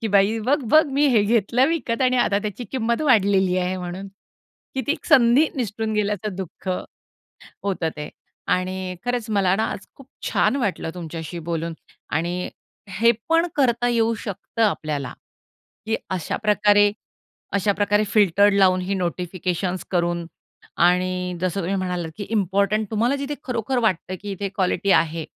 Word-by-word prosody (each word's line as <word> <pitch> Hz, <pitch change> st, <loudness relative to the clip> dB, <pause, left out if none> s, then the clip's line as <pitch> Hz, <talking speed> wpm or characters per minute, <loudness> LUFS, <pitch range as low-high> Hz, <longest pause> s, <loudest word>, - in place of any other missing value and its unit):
की 225 Hz, -, -2 dB
बाई 200 Hz, +2 st, +3 dB
बघ-बघ 290 Hz, +2 st, +4 dB
मी 290 Hz, +2 st, +3 dB
हे 225 Hz, -5 st, +4 dB
घेतलं 230 Hz, +4 st, +2 dB
विकत 265 Hz, -7 st, -1 dB
आणि 255 Hz, 0 st, +3 dB
आता 200 Hz, -4 st, +2 dB
त्याची 215 Hz, +3 st, -4 dB
किंमत 235 Hz, +2 st, 0 dB
वाढलेली 195 Hz, -8 st, +3 dB
आहे 185 Hz, +1 st, -1 dB
म्हणून. 180 Hz, +2 st, -6 dB, 0.7 s
की 265 Hz, -, 0 dB
ती 300 Hz, -, +2 dB
संधी 255 Hz, +5 st, +5 dB
निसटून 220 Hz, -2 st, -2 dB
गेल्याचं 210 Hz, -1 st, -1 dB
दुःख, 190 Hz, 0 st, -7 dB, 0.9 s
होतं 190 Hz, -5 st, -1 dB
ते. 150 Hz, -, -5 dB, 0.4 s
आणि 185 Hz, 0 st, -1 dB
खरंच 245 Hz, -2 st, -2 dB
मला 195 Hz, -3 st, +3 dB
ना, 220 Hz, -, +1 dB
आज 190 Hz, -, -8 dB
खूप 275 Hz, -, -15 dB, 0.2 s
छान 275 Hz, -, +2 dB
वाटलं 205 Hz, -9 st, -2 dB
तुमच्याशी 165 Hz, -1 st, -6 dB
बोलून 165 Hz, 0 st, -3 dB, 0.4 s
आणि 175 Hz, +3 st, -1 dB, 0.4 s
हे 230 Hz, +5 st, +3 dB, 0.2 s
पण 330 Hz, +1 st, +3 dB
करता 245 Hz, -3 st, +2 dB
येऊ 230 Hz, -1 st, +2 dB
शकतं 205 Hz, +3 st, -4 dB
आपल्याला, 150 Hz, -, -1 dB, 0.7 s
की 225 Hz, -, +1 dB
अशाप्रकारे 205 Hz, +3 st, +3 dB, 0.6 s
अशाप्रकारे 205 Hz, +1 st, +2 dB
फिल्टर्ड 205 Hz, -2 st, +4 dB
लावून 185 Hz, -2 st, +4 dB
ही 190 Hz, +2 st, -2 dB
नोटिफिकेशन्स 180 Hz, 0 st, -2 dB
करून 175 Hz, -1 st, 0 dB, 0.5 s
आणि 180 Hz, +1 st, +2 dB
जसं 185 Hz, +1 st, -1 dB
तुम्ही 190 Hz, +3 st, -1 dB
म्हणालात 180 Hz, -3 st, -2 dB
की 205 Hz, -, -5 dB
इम्पॉर्टंट 200 Hz, +1 st, +1 dB
तुम्हाला 235 Hz, +6 st, +1 dB
जिथे 280 Hz, +1 st, -3 dB
खरोखर 250 Hz, 0 st, -1 dB
वाटतं 185 Hz, -5 st, 0 dB
की 205 Hz, 0 st, -6 dB
इथे 200 Hz, +1 st, -3 dB
क्वालिटी 190 Hz, 0 st, 0 dB
आहे. 165 Hz, -1 st, +2 dB
200 Hz, 145 wpm, -23 LUFS, 180-230 Hz, 0.9 s, संधी